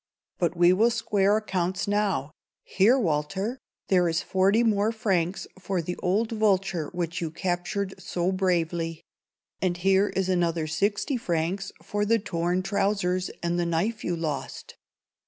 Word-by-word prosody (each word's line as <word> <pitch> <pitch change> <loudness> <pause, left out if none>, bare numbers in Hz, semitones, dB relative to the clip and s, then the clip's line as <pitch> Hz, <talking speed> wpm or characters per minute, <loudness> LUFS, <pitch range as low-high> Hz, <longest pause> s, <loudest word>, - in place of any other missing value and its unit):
But 175 -1 0
we 175 +1 +6
will 220 +5 +4
square 210 -3 +2
accounts 190 -4 -2
now. 200 -9 0 0.3
Here, 215 +7 +3
Walter; 190 - -1 0.3
there 180 -3 +4
is 165 +1 -1
forty 195 +4 +3 0.3
francs 190 -5 -1
for 190 -1 -2
the 175 +2 -3
old 205 +5 0
vulture 195 -7 +1
which 175 -1 -3
you 165 - -2
captured 180 +3 -2
so 175 0 -1
bravely; 170 -3 -1 0.6
and 180 -2 0
here 195 +3 +3
is 190 -1 -1
another 170 -3 +1
sixty 205 - 0
francs 180 -1 -2
for 205 0 -1
the 225 +2 +3
torn 180 -3 -1
trousers 195 -2 0
and 170 0 0
the 175 - +1
knife 200 +7 -1
you 175 - -1
lost." 155 -5 -5
185 Hz, 140 wpm, -26 LUFS, 170-200 Hz, 0.6 s, we